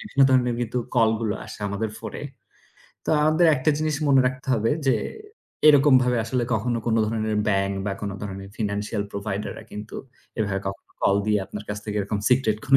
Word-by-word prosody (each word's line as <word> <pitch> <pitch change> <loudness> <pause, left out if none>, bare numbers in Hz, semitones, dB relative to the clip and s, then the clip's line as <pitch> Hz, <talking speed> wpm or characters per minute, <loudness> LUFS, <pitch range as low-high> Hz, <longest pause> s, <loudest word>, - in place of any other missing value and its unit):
বিভিন্ন 210 -10 -3
ধরনের 125 -2 +3
কিন্তু 120 +1 -1 0.2
call 115 -3 +5
গুলো 110 -2 -1
আসে - - -10
আমাদের 105 +2 -2
phone - - -7
এ। - - -5 0.8
তো - - +1
আমাদের 155 +3 +4
একটা 130 +4 +2
জিনিস 155 -2 0
মনে 135 -1 +6
রাখতে 130 +1 -3
হবে 115 0 +1 0.2
যে, 125 - +4 0.7
এরকমভাবে 130 -4 +5
আসলে 125 +1 -1
কখনো 115 +2 0
কোনো 115 -1 +2
ধরনের 110 -1 -1
bank 100 -1 +1
বা 100 - 0
কোনো 100 -1 -3
ধরনের 100 -1 -6
financial 105 0 -2
provider 100 0 -3
রা - - -9
কিন্তু 105 +1 -7 0.4
এভাবে 100 -3 0
কখনো 100 - -9
call 100 - +4
দিয়ে 105 -2 +2
আপনার 105 0 -7
কাছ 105 0 -3
থেকে 105 -1 -4
এরকম 100 +1 -2
secret 125 -4 +3
কোনো 135 0 +7
110 Hz, 190 wpm, -24 LUFS, 105-130 Hz, 0.8 s, কোনো